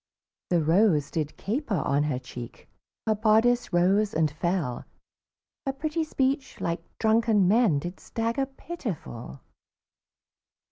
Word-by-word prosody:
The 175 -3 +2
rose 165 -2 +3
did 155 -2 -3
caper 230 +1 -2
on 140 -1 +1
her 145 -4 -1
cheek, 125 -2 -9 0.4
Her 220 - +3
bodice 225 +3 +3
rose 195 +4 +3
and 155 -2 +2
fell, 155 -5 -1 0.8
Her 270 - +1
pretty 310 +4 -2
speech, 270 -2 -1
like 170 0 -2 0.2
drunken 220 -3 +3
men, 210 -6 +4
Did 175 +6 -5
stagger 230 +4 -2
pitiful. 215 - -7
200 Hz, 120 wpm, -27 LUFS, 155-240 Hz, 0.8 s, men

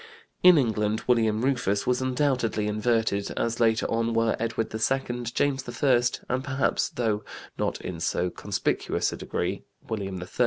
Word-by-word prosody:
In 180 -2 +8
England 110 -4 +1
William 115 -1 +2
Rufus 120 -7 +1
was 125 0 +1
undoubtedly 125 -5 0
inverted, 105 -1 0
as 115 0 -1
later 115 -1 +3
on 115 0 0
were 115 0 +2
Edward 115 -1 -2
II, 120 +2 -1
James 135 +2 -1
I, 130 -4 +5 0.3
and, 130 +1 -1
perhaps, 135 -1 0
though 110 -3 -1 0.3
not - - -2
in 90 -3 -5
so 90 +2 0
conspicuous - - -1
a - - -6
degree, - - -3 0.3
William 95 -4 -3
III. 90 - -7
115 Hz, 150 wpm, -26 LUFS, 110-125 Hz, 0.3 s, In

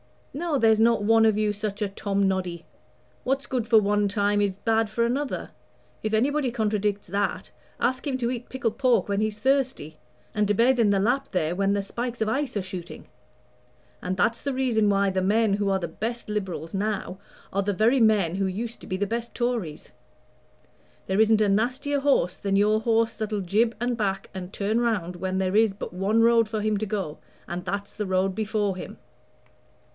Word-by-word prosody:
No, 315 0 -1
there's 220 -3 +4
not 230 -2 +3
one 225 +1 +5
of 215 -2 +3
you 210 -1 +1
such 205 0 -4
a 205 - 0
Tom 200 0 0
noddy. 180 -3 -2 0.6
What's 270 +2 -1
good 245 -4 -2
for 225 -2 +6
one 205 0 +1
time 205 0 +1
is 195 -2 0
bad 225 +1 +1
for 235 +2 0
another. 265 +4 -2 0.5
If 215 0 -2
anybody 265 +4 +1
contradicts 210 -3 -1
that, 200 +2 -2 0.3
ask 255 +4 0
him 265 -2 0
to 240 -1 0
eat 245 -1 -6
pickled 235 -3 -3
pork 245 -7 +3
when 200 0 0
he's 215 -1 -1
thirsty, 255 - 0 0.3
and 210 -1 +1
to 205 - +2
bathe 245 +4 +3
in 220 -3 +4
the 200 -1 +3
Lapp 255 +6 +1
there 165 -2 0
when 195 +2 +1
the 200 -1 0
spikes 240 +4 -5
of 220 - +1
ice 265 -1 -1
are 200 - -1
shooting. 185 -2 -8 0.9
And 185 +1 -3
that's 230 +5 +1
the 280 - -2
reason 240 -5 +2
why 200 -1 +2
the 185 0 0
men 210 +2 +2
who 200 -1 0
are 195 0 +1
the 170 - -3
best 225 +7 -4
Liberals 190 -6 -4
now 195 -2 -2 0.3
are 200 - +1
the 200 +1 -1
very 225 +7 +3
men 210 -7 +3
who 195 0 0
used 225 +5 -4
to - - -11
be 185 - -2
the 205 - 0
best 230 +3 -4
Tories. 235 -11 -3 1.1
There 190 +3 +2
isn't 220 0 +4
a 210 - +3
nastier 255 +8 0
horse 275 -10 +2
than 195 -1 -1
your 210 +2 +3
horse 225 0 +1
that'll 215 -2 -3
jib 220 +6 +1
and 240 0 -1
back 195 -3 -2
and 185 -1 -7
turn 210 +4 0
round 190 -7 -1
when 185 +1 -2
there 190 0 0
is 220 -2 +4
but - - -7
one 200 +5 +1
road 230 -1 +4
for 215 -1 -2
him 215 0 +1
to 215 +1 -3
go, 190 -7 -3 0.3
and 175 +1 -5
that's 200 +1 -3
the 210 - -4
road 185 +1 +1
before 210 -2 -1
him. - - -8
210 Hz, 200 wpm, -25 LUFS, 195-235 Hz, 1.1 s, for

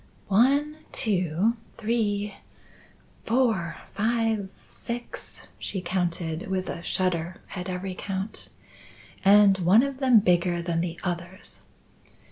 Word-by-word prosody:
"One, 280 +9 +3
two, 195 +1 +1 0.2
three, 210 -3 -1 0.9
four, 225 -8 +1
five, 225 -2 0 0.2
six," 240 0 -7
she 195 - -3
counted, 170 -2 -2
with 190 -1 -2
a - - -6
shudder 175 -1 -1 0.2
at 180 0 -4
every 185 +1 -3
count. 195 +3 -5 0.7
"And 200 0 +6
one 185 +7 +6
of 275 -1 -3
them 260 -4 +6
bigger 175 -2 +2
than 170 -1 -1
the 170 -1 -4
others." 175 +2 -5
190 Hz, 105 wpm, -26 LUFS, 175-225 Hz, 0.9 s, And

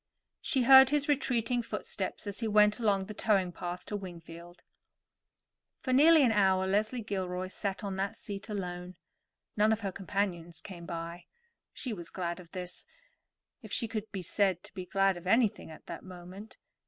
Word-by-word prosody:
She 265 -5 +1
heard 265 +1 +9
his 290 0 +1
retreating 250 -4 +1
footsteps 230 - -4
as 200 -1 -5
he 230 - -1
went 210 +1 +4
along 200 -4 +2
the 215 - -7
towing 200 -4 +2
path 175 +1 -6
to 210 - -4
Wingfield. 175 -2 -9 1.2
For 255 - -1
nearly 310 +3 +7
an 245 - +4
hour 190 -3 +3
Leslie 215 +5 0
Gilroy 185 -2 -3
sat 195 0 -4
on 195 -2 -3
that 195 +3 -1
seat 200 -1 -7
alone. 180 -3 -5 0.6
None 215 +1 +4
of 220 0 0
her 195 -2 -2
companions 185 -3 -3
came 175 -4 -9
by. 170 0 -6 0.5
She 250 - -5
was 175 -5 -7
glad 175 -1 -3
of 175 -2 -13
this, 180 0 -7 0.7
if - - -11
she 230 - 0
could 220 -1 -5
be 190 -3 -5
said 185 0 +1
to - - -14
be 185 -1 -6
glad 195 -1 +2
of 175 +1 -9
anything 225 -2 +2
at 155 - -12
that - - -7
moment. 185 +3 -11
195 Hz, 175 wpm, -31 LUFS, 180-220 Hz, 1.2 s, heard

